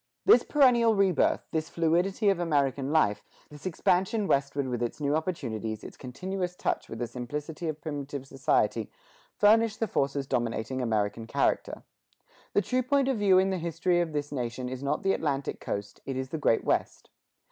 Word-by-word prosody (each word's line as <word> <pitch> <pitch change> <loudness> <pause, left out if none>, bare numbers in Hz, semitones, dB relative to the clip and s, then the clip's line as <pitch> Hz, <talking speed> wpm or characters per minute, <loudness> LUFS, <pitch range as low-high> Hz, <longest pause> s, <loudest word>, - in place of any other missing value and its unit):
This 425 - +7
perennial 240 -6 +4
rebirth, 195 -4 +2
this 160 -1 -2
fluidity 175 +5 +1
of 195 -3 +1
American 140 -4 0
life, 155 -10 +2 0.3
this 150 +4 -7
expansion 185 +4 +1
westward 140 -4 0
with 120 -2 -3
its 120 +4 -3
new 145 0 +1
opportunities, 115 - -3
its - - -9
continuous 180 +7 -4
touch - - -2
with 115 - -6
the 120 - -2
simplicity 145 +7 -5
of 155 -1 -3
primitive 145 -2 -5
society, 115 -5 0 0.5
furnish 220 +1 +4
the 225 - -1
forces 140 -4 -1
dominating 120 +1 -2
American 110 -1 -1
character. - - 0 0.7
The 205 - +3
true 255 +7 0
point 270 +1 +2
of 265 - +1
view 195 -2 +5
in 190 +1 +3
the 185 - -1
history 170 +1 +1
of 170 -2 -2
this 145 -1 -3
nation 125 -2 -3
is 130 0 -6
not 140 +2 -1
the 195 0 +3
Atlantic 140 -3 -2
coast, 100 0 -5
it 135 -1 -3
is 130 0 -3
the 160 - -4
Great 115 - +2
West. - - -1
150 Hz, 175 wpm, -28 LUFS, 130-185 Hz, 0.7 s, This